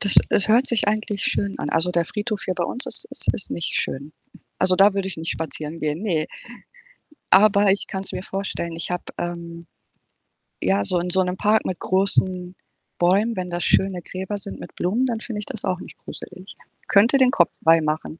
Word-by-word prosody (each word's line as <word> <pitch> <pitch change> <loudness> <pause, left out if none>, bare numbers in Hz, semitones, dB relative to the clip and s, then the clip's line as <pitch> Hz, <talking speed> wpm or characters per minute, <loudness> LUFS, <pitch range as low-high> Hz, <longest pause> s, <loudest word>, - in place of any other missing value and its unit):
Das 200 - +7
das 200 - +2
hört 240 +5 +4
sich 225 -4 +2
eigentlich 210 -1 -1
schön 200 0 -1
an. 145 - -3
Also, 165 +3 +1
der 170 -1 +1
Friedhof 210 +2 -3
hier 185 - -1
bei 175 - -2
uns 250 +9 -3
ist - - +1
ist - - +3
ist 200 - -2
nicht 170 - -2
schön. 140 +3 -3 0.5
Also, 185 0 +3
da 195 +2 +5
würde 195 -1 -2
ich 190 - -6
nicht 160 +1 -2
spazieren 160 0 -5
gehen, 155 +4 -2
ne. 160 -7 0 1.0
Aber 200 0 +5
ich 200 - 0
kann's 190 -1 -2
mir 185 - -5
vorstellen, 190 -4 -4
ich 165 - -4
habe, 180 - -3 0.2
ähm 170 -1 -6 0.9
ja, 95 +2 +1
so 180 - +1
in 180 +1 -3
so 190 +1 +3
'nem 180 0 -3
Park 215 +1 +2
mit 185 - -3
großen 185 -1 0 0.4
Bäumen, 200 +6 +2
wenn 185 -2 -4
das 175 0 -1
schöne 190 -2 +2
Gräber 190 +4 -5
sind 200 - -6
mit - - -10
Blumen, 215 +9 0
dann 235 -3 -2
finde 230 -2 -6
ich 210 - -4
das 225 -7 -3
auch 185 -1 -1
nicht - - -12
gruselig. 185 +2 -6 0.3
Könnte 225 +7 +5
den 260 -1 +4
Kopf 175 - +3
freimachen. 160 0 +1
185 Hz, 200 wpm, -22 LUFS, 170-205 Hz, 1.0 s, Das